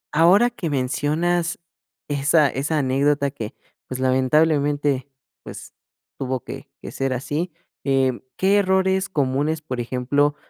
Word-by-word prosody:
ahora 190 +10 +5
que 175 -9 -4
mencionas 155 +6 0 0.5
esa 145 +1 +3
esa 145 +5 -1
anécdota 140 +1 +1
que, 110 -6 -7 0.3
pues, 130 0 -5
lamentablemente, 140 +1 +2 0.4
pues, - - -10 0.5
tuvo 130 -2 -2
que 135 +1 -9
que - - -6
ser 135 -1 -1
así, 150 +7 -3 0.3
em, 135 -2 +1 0.2
¿qué 195 +2 +3
errores 190 -1 +2
comunes, 145 0 0
por 130 -5 -4
ejemplo, 130 +4 +1
145 Hz, 120 wpm, -22 LUFS, 130-165 Hz, 0.5 s, ahora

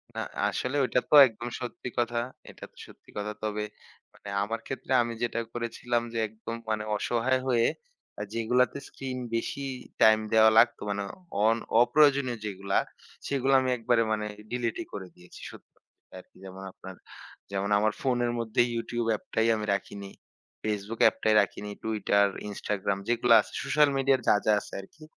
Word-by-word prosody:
না, - - -2 0.3
আসলে 125 +2 -2
ঐটা 125 - +1
তো - - +5
একদম 120 +1 -7
সত্যি 125 0 -6
কথা। 120 0 0 0.3
এটা - - -13
তো - - -35
সত্যি - - -19
কথা। 105 +1 -3
তবে, 105 0 -2 0.5
মানে 100 - -11
আমার 115 +2 -3
ক্ষেত্রে 135 0 -6
আমি 120 0 -2
যেটা 120 -1 -1
করেছিলাম 120 0 -2
যে, - - -3
একদম 110 +2 -7
মানে 110 -1 -1
অসহায় 120 +5 0
হয়ে 120 -3 +3 0.5
আ - - -3
যেগুলাতে 125 +4 +1
স্ক্রিন 130 -1 -6 0.2
বেশি 125 +4 -3 0.4
টাইম 110 0 +7
দেওয়া 110 0 +7
লাগতো, 115 +1 +5
মানে 100 0 -2 0.4
অন 115 +1 +4 0.2
অপ্রয়োজনীয় 135 -1 +3
যেগুলা, 100 -1 -2 0.5
সেগুলা 135 -1 +1
আমি 130 - -1
একবারে 115 0 +2
মানে 105 -1 -1 0.3
ডিলিটই 120 -2 -2
করে 95 -2 -6
দিয়েছি 90 0 -15
সত্যি - - -15
কথা - - -41 0.2
আরকি। - - -19
যেমন, 95 0 -9
আপনার 95 0 -11 0.6
যেমন, 100 0 -2
আমার 110 0 +1
ফোনের 120 -2 +1
মধ্যে 115 0 +1
ইউটিউব 115 0 -2
অ্যাপটাই 110 +1 -1
আমি 105 - -3
রাখিনি, 100 0 -5 0.5
ফেসবুক 105 +1 -3
অ্যাপটাই 110 0 +3
রাখিনি। 105 +1 -4
টুইটার, 105 -2 +2 0.2
ইনস্টাগ্রাম 100 -1 -2
যেগুলা 120 0 +4
আছে, - - -14
সোশ্যাল 145 +2 +3
মিডিয়ার 135 0 +3
যা, - - +6
যা 110 - +4
আছে - - -13
আরকি, 155 +11 -17
115 Hz, 160 wpm, -28 LUFS, 105-120 Hz, 0.6 s, টাইম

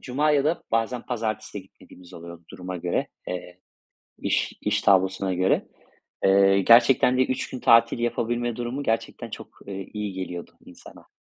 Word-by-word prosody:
cuma 145 +4 0
ya 145 -1 +2
da 160 +3 0
bazen 115 +2 -1
pazartesi 110 -4 -4
gitmediğimiz 90 -1 -17
oluyordu 85 0 -11
duruma 90 0 -7
göre, 90 0 -2 0.2
eee, 90 0 -6 0.6
iş - - -1
iş - - 0
tablosuna 95 0 +2
göre. 95 +1 +1 0.6
Eee, 95 0 +5
gerçekten 120 +3 +5
de 130 - +4
3 130 - -3
gün 130 - -6
tatil 115 +1 +4
yapabilme 120 0 -1
durumu 120 +4 -4
gerçekten 115 -2 -2
çok, - - -8 0.2
eee, 95 -1 -6
iyi 105 -2 -4
geliyordu 90 -2 -6
insana. - - -15
110 Hz, 150 wpm, -24 LUFS, 95-120 Hz, 0.6 s, Eee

